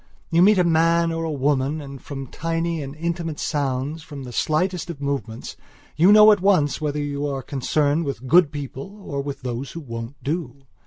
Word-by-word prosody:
You 165 +1 +4
meet 205 +2 +6
a 180 - +4
man 165 0 +3
or 165 0 -2
a 160 - -2
woman 140 +1 0
and, 140 -2 -9
from 135 -2 -6
tiny 165 +3 -2
and 140 0 -7
intimate 165 -1 -3
sounds, 140 +1 -2
from 150 -4 -9
the 125 - -8
slightest 175 +7 0
of 165 -5 -6
movements, 140 -5 -4 0.4
you 175 +6 +6
know 215 0 +9
at 205 -3 +3
once 180 -7 +2
whether 150 -1 -1
you 145 0 -2
are 135 -2 -3
concerned 145 +3 0
with 135 -4 -5
good 165 +1 +5
people 145 +7 -7
or 140 -5 -3
with 140 0 -6
those 125 +2 -4
who 170 - -6
won't 115 -2 -7
do. 140 -3 -4
150 Hz, 195 wpm, -23 LUFS, 140-165 Hz, 0.4 s, know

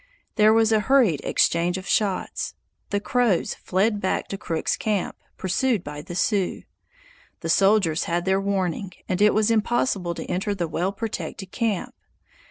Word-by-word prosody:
There 215 -1 +5
was 225 0 +4
a 220 - +4
hurried 215 - +3
exchange 175 +2 +2
of 190 +1 -8
shots; 200 -3 -1 0.3
the 205 - 0
Crows 235 -4 +1
fled 205 +3 0
back 185 - -1
to 195 - -4
Crook's 160 -1 -1
camp, 210 -4 -2 0.2
pursued 200 +2 0
by 150 0 -7
the 175 - -8
Sioux. 190 +1 0 0.8
The 165 - -4
soldiers 195 -3 +3
had 175 +1 -1
their 190 0 +2
warning, 195 -2 -2
and 185 +1 -1
it 210 -1 +5
was 215 +1 +3
impossible 210 -5 0
to - - -6
enter 200 +3 -2
the 175 -3 -2
well 175 +4 -1
protected 195 -2 -5
camp. 225 -6 -2
195 Hz, 160 wpm, -24 LUFS, 180-215 Hz, 0.8 s, There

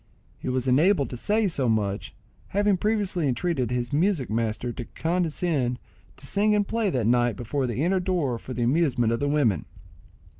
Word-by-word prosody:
He - - -4
was 130 0 -1
enabled 145 +4 +3
to - - -4
say 210 - +1
so 140 -9 0
much, 100 -3 -1 0.3
having 205 0 +2
previously 195 -5 0
entreated 130 -1 0
his 125 +1 -2
music 160 - +1
master 115 +2 -1
to 120 - -6
condescend 160 -7 -1 0.4
to 140 - -11
sing 210 +7 +2
and 205 -1 +1
play 225 -3 0
that 125 - -1
night 120 0 +2
before 130 +2 -2
the 120 +4 -2
inner 185 +2 +2
door 175 -10 -1
for 130 - -10
the 120 0 -2
amusement 125 -4 +2
of 115 - -1
the 145 - 0
women. 120 - +1
140 Hz, 180 wpm, -25 LUFS, 120-180 Hz, 0.4 s, enabled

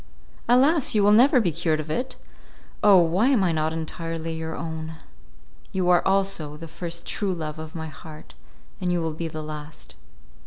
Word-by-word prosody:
Alas! 270 +2 +4
you 210 - +4
will 205 - +5
never 255 +5 +6
be 190 -7 +1
cured 160 0 0
of 155 0 -5
it. 255 +8 -2 0.7
Oh! 205 -2 +7
why 175 +7 +3
am 260 -8 +3
I 175 - +2
not 155 0 0
entirely 165 0 -4
your 160 0 -4
own? 160 -1 -5 0.8
You 185 -1 0
are 175 - +5
also 190 -6 0
the 165 +1 -8
first 170 +1 -6
true 195 -3 -2
love 155 -2 -5
of 160 +1 -8
my 160 -1 -4
heart, 155 0 -12 0.5
and 180 -1 -1
you 175 - +1
will 165 -1 -2
be 165 +1 -4
the 155 -1 -6
last. 150 0 -9
165 Hz, 185 wpm, -24 LUFS, 160-195 Hz, 0.8 s, Oh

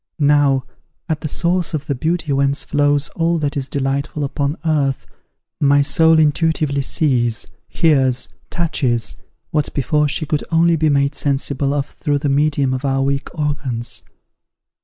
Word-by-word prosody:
Now, 145 -3 +3 0.4
at 155 -1 -2
the 155 - -3
source 175 +2 0
of 150 -1 -4
the 140 - -1
beauty 155 +2 -1
whence 140 +1 +1
flows 145 0 +1
all 165 +2 0
that 145 -3 -2
is 135 -2 -3
delightful 140 +2 -2
upon 140 +2 -2
earth, 145 -4 0 0.5
my 145 0 +4
soul 160 +3 +4
intuitively 155 -2 +1
sees, 125 -5 0 0.2
hears, 135 -6 +2 0.2
touches, 130 -10 -1 0.3
what 150 -1 0
before 150 +2 +1
she 155 - -1
could 150 0 -1
only 170 0 +3
be 155 -1 +2
made 140 0 +2
sensible 140 -1 0
of 140 -1 0
through 145 -1 -2
the 145 0 -1
medium 140 -1 +1
of 130 +1 -3
our 135 -1 +1
weak 140 +1 -1
organs. 140 -6 -2
145 Hz, 150 wpm, -19 LUFS, 135-155 Hz, 0.5 s, my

